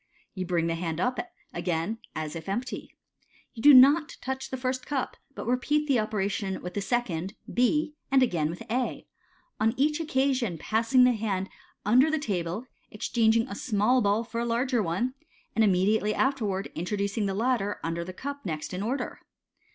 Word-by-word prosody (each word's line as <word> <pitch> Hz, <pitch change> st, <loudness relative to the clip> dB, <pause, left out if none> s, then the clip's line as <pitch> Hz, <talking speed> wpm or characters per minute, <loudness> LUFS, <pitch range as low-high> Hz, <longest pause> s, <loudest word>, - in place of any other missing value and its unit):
You 185 Hz, -2 st, -4 dB
bring 170 Hz, -2 st, +1 dB
the 165 Hz, -, 0 dB
hand 165 Hz, -1 st, -3 dB
up 250 Hz, +6 st, 0 dB, 0.3 s
again 175 Hz, +5 st, -2 dB, 0.2 s
as 155 Hz, 0 st, -4 dB
if 165 Hz, +2 st, -6 dB
empty. 240 Hz, +6 st, -4 dB, 0.6 s
You 225 Hz, -, -8 dB
do 290 Hz, -, +9 dB
not 285 Hz, +4 st, +7 dB
touch 265 Hz, +1 st, -4 dB
the 260 Hz, -, -4 dB
first 255 Hz, 0 st, -2 dB
cup, 275 Hz, -3 st, -2 dB, 0.2 s
but -, -, -6 dB
repeat 290 Hz, +5 st, +1 dB
the 270 Hz, -5 st, +3 dB
operation 200 Hz, -2 st, -1 dB
with 180 Hz, 0 st, -5 dB
the 205 Hz, -, -2 dB
second, 195 Hz, -5 st, -1 dB, 0.2 s
B, 300 Hz, +5 st, +2 dB, 0.2 s
and 270 Hz, -1 st, +5 dB
again 165 Hz, -10 st, +1 dB
with 175 Hz, +7 st, -6 dB
A; 245 Hz, +2 st, -2 dB, 0.5 s
on 225 Hz, +2 st, +2 dB
each 300 Hz, +3 st, +2 dB
occasion 265 Hz, -, +1 dB
of -, -, -11 dB
passing 230 Hz, -, +3 dB
the 250 Hz, -, +6 dB
hand 205 Hz, -4 st, -2 dB, 0.4 s
under 255 Hz, +8 st, +5 dB
the 315 Hz, -, +1 dB
table 195 Hz, -, -2 dB, 0.2 s
exchanging 225 Hz, +2 st, +2 dB
a -, -, -6 dB
small 220 Hz, +4 st, +2 dB
ball 205 Hz, +2 st, +2 dB
for 230 Hz, 0 st, -4 dB
a -, -, 0 dB
larger 240 Hz, +1 st, +1 dB
one, 195 Hz, +8 st, -1 dB, 0.4 s
and 225 Hz, -, +4 dB
immediately 210 Hz, +2 st, +2 dB
afterwards 215 Hz, -8 st, 0 dB
introducing 200 Hz, +4 st, -1 dB
the 195 Hz, -, -2 dB
latter 220 Hz, -2 st, 0 dB
under 165 Hz, +1 st, -2 dB
the 180 Hz, -, -7 dB
cup 280 Hz, +8 st, -6 dB
next 155 Hz, -3 st, -4 dB
in 180 Hz, -, -3 dB
order. 245 Hz, +4 st, -3 dB
220 Hz, 175 wpm, -28 LUFS, 190-255 Hz, 0.6 s, do